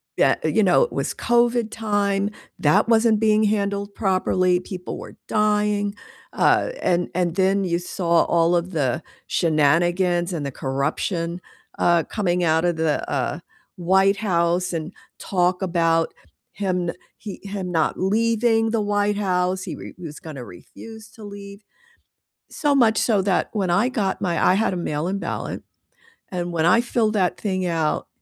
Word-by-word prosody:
Yeah, - - +3
you - - +2
know, - - +4
it 480 - -4
was - - -2
COVID 240 -1 +1
time, 205 -2 0 0.3
that 150 +8 +3
wasn't 225 -1 +3
being 215 0 +3
handled 200 -1 -1
properly, 185 -2 +1
people 180 -1 -7
were - - -11
dying, 210 -1 +1 0.4
uh, - - +3
and 175 0 +1
and 175 -2 0
then 195 +1 +2
you 170 -2 0
saw 175 -1 +1
all 170 +1 +2
of 175 +2 -1
the 145 0 0 0.2
shenanigans 175 +3 +2
and 155 -5 -3
the 140 - -3
corruption, 165 +7 -2 0.4
uh, 170 -1 +3
coming 180 -3 -1
out 160 0 +2
of 175 -1 +1
the, 160 -2 -1
uh, 145 +2 -1 0.4
White 190 +3 +3
House, 180 -3 0
and 165 +2 -4 0.2
talk 180 0 0
about 165 -2 +1 0.4
him 185 -3 -2
no 170 - -2 0.2
he, 205 -3 -8
him 195 -2 -5
not 160 -2 0
leaving 225 +3 +2
the 220 -1 0
White 205 0 0
House, 185 -2 0
he - - -5
re - - -10
he 180 - -12
was 150 -1 -8
gonna 140 -6 -8
refuse 220 - -12
to 225 - -14
leave, 200 0 -10 0.9
so 290 -2 0
much 225 -5 +4
so 210 -5 +2
that 190 -1 +1
when 195 -5 -1
I 175 +8 +3
got 200 -6 -1
my 175 -2 -1
I 180 - +5
had 215 +2 +1
a - - -4
mail-in 175 +3 -2
ballot, - - -4 0.7
and 175 -1 -3
when 165 -1 +1
I 185 +6 +5
filled 235 -2 0
that 190 -4 +1
thing 185 -3 -1
out 165 -3 -1
185 Hz, 160 wpm, -22 LUFS, 170-210 Hz, 0.9 s, I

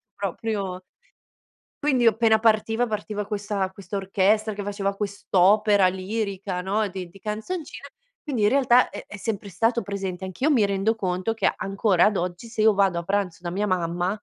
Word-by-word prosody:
proprio 195 -1 -3 1.0
Quindi 260 -5 +2
appena 220 0 +4
partiva, 225 +2 +2
partiva 210 -1 -3
questa 205 -2 -2
questa 200 +1 -8
orchestra 200 +3 +1
che 205 - -5
faceva 200 0 -2
quest'opera 200 0 +3
lirica, 190 0 -3
no, 205 +3 0
di 185 -1 -6
di 195 - -16
canzoncine 220 - -5 0.3
quindi 255 -9 -2
in 205 - +5
realtà 255 -2 +4
è - - -8
è - - -9
sempre 205 0 -4
stato 225 +5 +1
presente. 195 -2 -4
Anch'io 255 - 0
mi 225 -7 +4
rendo 200 +3 0
conto 185 +1 -1
che 225 - +2
ancora 195 -2 +2
ad 210 -2 +2
oggi 180 +5 -4
se 220 -2 -3
io 220 -1 +6
vado 190 -3 +2
a - - -6
pranzo 190 -2 -1
da 175 - -3
mia 200 +4 -1
mamma, 175 -1 0
200 Hz, 170 wpm, -24 LUFS, 190-220 Hz, 1.0 s, io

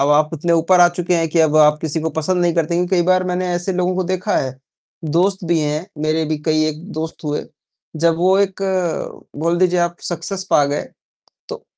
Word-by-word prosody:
अब 140 - +2
आप 150 +1 +3
इतने 170 +2 -1
ऊपर 170 +2 +3
आ 175 - +7
चुके 175 0 -1
हैं 165 -1 0
कि 165 - -1
अब 155 -1 +3
आप 150 0 +5
किसी 160 0 -2
को 160 +1 -2
पसंद 180 +3 0
नहीं 170 -1 +1
करते। 165 0 0
क्योंकि 175 +1 0
कई 175 - +3
बार 185 0 +3
मैंने 180 0 -2
ऐसे 175 +2 -2
लोगों 180 0 0
को 185 - 0
देखा 185 +1 -1
है, 130 -1 -2 0.5
दोस्त 180 +5 +1
भी 170 0 +1
हैं, 150 +3 -2 0.2
मेरे 155 +1 +1
भी 155 0 -2
कई 155 -1 +2
एक 155 +1 -4
दोस्त 160 +1 -5
हुए, 150 0 -2 0.5
जब 165 +1 +2
वो 185 +3 +3
एक 195 -1 0 0.8
बोल 170 +3 0
दीजिए 180 -1 +2
आप 175 0 -1
सक्सेस 185 +2 -4
पा 145 - +5
गए, 145 +1 -2 0.7
तो - - -7
170 Hz, 220 wpm, -19 LUFS, 155-180 Hz, 0.8 s, आ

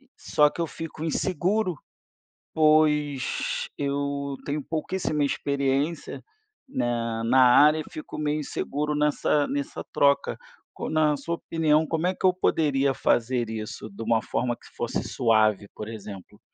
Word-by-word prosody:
Só 150 0 +3
que - - -5
eu 165 - 0
fico 160 0 -7
inseguro, 185 +4 0 0.8
pois 150 -3 +2
eu 140 0 -2
tenho 145 +1 -2
pouquíssima 155 -1 -1
experiência 140 +3 -1 0.5
na 115 - -1
na 130 +3 +5
área, 145 +5 +6
eu 155 - -4
fico 155 - -8
meio 150 0 0
inseguro 150 +1 -2
nessa 150 0 +2
nessa 140 0 -4
troca 140 -1 +2 0.3
co - - -5
na 155 -2 +2
sua 165 +5 -3
opinião, 160 -2 +1
como 160 +2 -1
é 185 - +1
que - - -12
eu 185 - +6
poderia 140 -6 +1
fazer 120 -1 +1
isso 110 0 -6
de 100 +3 -8
uma 115 0 +2
forma 120 0 -1
que - - -24
se - - -18
fosse - - -2
suave, 110 -3 +2
por 105 - -7
exemplo? 105 -4 -9
145 Hz, 145 wpm, -26 LUFS, 125-155 Hz, 0.8 s, área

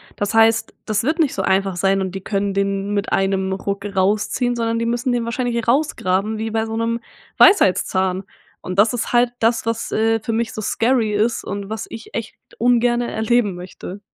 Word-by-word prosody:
Das 205 +2 -2
heißt, 225 0 +3
das 215 -1 0
wird 315 +6 0
nicht 305 -5 +2
so 190 - -1
einfach 195 0 +1
sein 195 +2 +1
und 190 0 -4
die 190 - -4
können 200 0 -1
den 200 +1 -1
mit 200 0 -2
einem 195 0 +1
Ruck 200 +1 -4
rausziehen, 205 +5 0
sondern 230 0 -1
die 230 - -1
müssen 240 +2 0
den 240 -1 0
wahrscheinlich 235 -1 -2
rausgraben 220 -7 +1
wie 225 +1 -3
bei 220 0 0
so 225 0 -5
'nem 230 +1 -1 0.4
Weisheitszahn. 190 - +4 0.4
Und 185 +2 -4
das 220 +3 +5
ist 240 - -3
halt 240 0 +4
das, 230 0 +1
was, 230 0 -2
äh, 225 +1 +2
für 225 +1 -4
mich 230 0 -1
so 215 - -5
scary 225 0 +1
ist 220 +3 0
und 200 0 -5
was 220 0 -4
ich 225 - -10
echt 230 -1 -4 0.2
ungerne 240 0 +2
erleben 220 -3 +1
möchte. 180 +2 -9
220 Hz, 195 wpm, -20 LUFS, 195-235 Hz, 0.4 s, das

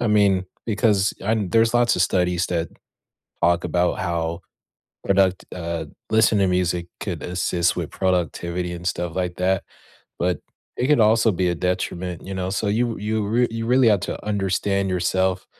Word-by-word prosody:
I 120 - 0
mean, 100 -3 +3 0.2
because 105 -3 +2
and 105 -2 -1
there's 115 +1 +3
lots 120 -1 +3
of 90 - +3
studies 90 -1 +1
that 85 -1 -2 0.7
talk 85 0 +3
about 90 0 +1
how 85 -2 -2 0.6
product 95 -1 +2
uh, 85 -2 -3 0.3
listen 110 -1 +4
to 100 - +3
music 90 -1 0
could - - -4
assist 90 -1 0
with - - -3
productivity 90 -1 -1
and 85 0 -7
stuff 85 -2 -2
like 90 -1 -2
that, 95 0 +1 0.5
but 90 0 0 0.4
it 125 - 0
could 150 -4 +4
also 110 +1 +4
be 90 0 0
a 85 - 0
detriment, 90 -1 -2
you 95 - -6
know? 95 0 -2
So 100 +2 -1
you 115 +2 0
you 105 +1 -1
r 110 +4 0
you 115 0 -4
really 125 0 +4
have 105 -3 +3
to - - -4
understand 100 -1 0
yourself, 95 +1 0
95 Hz, 170 wpm, -22 LUFS, 90-105 Hz, 0.7 s, listen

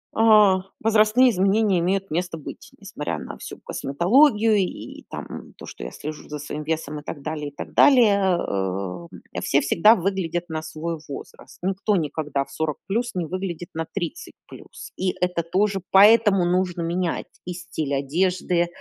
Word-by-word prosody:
а, 210 -4 +5 0.2
возрастные 225 +3 +4
изменения 195 0 +2
имеют 190 +2 -1
место 175 +1 -2
быть, 150 - -10
несмотря - - -5
на - - -8
всю - - -8
косметологию 215 - +3
и 190 -3 -4
там - - -8
то, - - -10
что - - -9
я - - -6
слежу 155 0 -8
за 150 - -5
своим 150 +1 -6
весом 155 -1 -3
и - - -13
так 145 -1 -7
далее, 155 -1 -4
и 145 - -23
так - - -8
далее, 235 -8 +5 0.2
э, 95 - -3
м. - - -9
Все - - +2
всегда 215 +7 +5
выглядят 175 -2 -2
на 160 -1 -3
свой 160 +1 -5
возраст. 140 - -10
Никто 195 +2 0
никогда 150 -3 -2
в - - -19
40 155 -2 -2
плюс 235 +4 -2
не 180 -2 -1
выглядит 175 0 -5
на 160 0 -4
30 200 - -5
плюс, - - -12
и 185 -1 -1
это 180 -1 0
тоже, 195 +3 0
поэтому 205 -2 +6
нужно 180 -1 0
менять 170 +1 -2 0.2
и 180 - -4
стиль 155 -4 -4
одежды, 175 +4 0
180 Hz, 165 wpm, -23 LUFS, 155-200 Hz, 0.2 s, поэтому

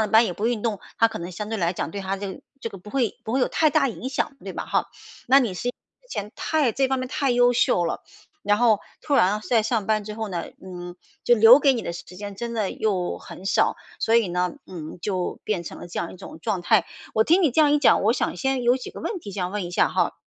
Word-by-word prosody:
了 215 - +1
班 220 +2 +6
也 180 - -2
不 205 +5 -2
运 235 -3 -1
动， 215 -5 -1 0.2
他 230 - +5
可 225 -1 -5
能 175 +1 -6
相 205 +4 -6
对 225 - -2
来 170 -1 +1
讲 165 - -3
对 200 - -5
他 195 0 -2
这 195 -1 -5
个 - - -12 0.2
这 - - -2
个 195 - -9
不 195 - -13
会 245 -4 0
不 220 - -4
会 265 - +2
有 - - +3
太 315 - +3
大 280 -2 +3
影 245 +2 -5
响， 270 +2 -1
对 - - -6
吧 - - -4
哈？ - - +1 0.4
那 265 +3 +7
你 240 -7 0
是 240 - -3
因 - - -1
为 - - -34
之 - - -9
前 205 +2 -4
太 300 -7 +1
这 265 +3 +1
方 265 0 0
面 255 - -3
太 275 +1 0
优 245 0 +4
秀 180 -7 +2
了， 165 - -3 0.4
然 205 0 +3
后 225 -3 +4 0.2
突 290 - 0
然 205 -3 +3
在 230 -3 +4
上 225 -2 -1
班 215 -1 +1
之 210 +1 -7
后 220 -1 -4
呢， 175 -3 -3 0.2
嗯， 175 -1 -8 0.3
就 240 - +6
留 230 +4 +8
给 275 -2 +4
你 230 - -3
的 170 - -4
时 175 - -7
间 205 +1 -6
真 235 +3 -5
的 215 -4 0
又 190 -5 -1
很 185 - -11
少， 195 - +2 0.2
所 225 +1 +3
以 230 -5 +3
呢， 180 0 -1
嗯， 165 -2 -8
就 185 -3 -2
变 195 -5 -1
成 - - -8
了 - - -8
这 170 - -3
样 170 - -4
一 - - -12
种 160 - -11
状 190 -1 -2
态。 200 0 +3 0.3
我 220 - +5
听 345 +10 +4
你 310 - +4
这 280 - +3
样 300 -2 +5
一 295 - +4
讲， 285 - +4
我 220 +4 +4
想 - - -1
先 265 -2 0
有 245 +1 +4
几 255 - -7
个 - - -9
问 390 -6 -3
题 205 - -8
想 180 -2 -3
问 205 -2 -2
一 - - -7
下 175 - +3
哈。 - - 0
220 Hz, 305 characters per minute, -24 LUFS, 190-245 Hz, 0.4 s, 留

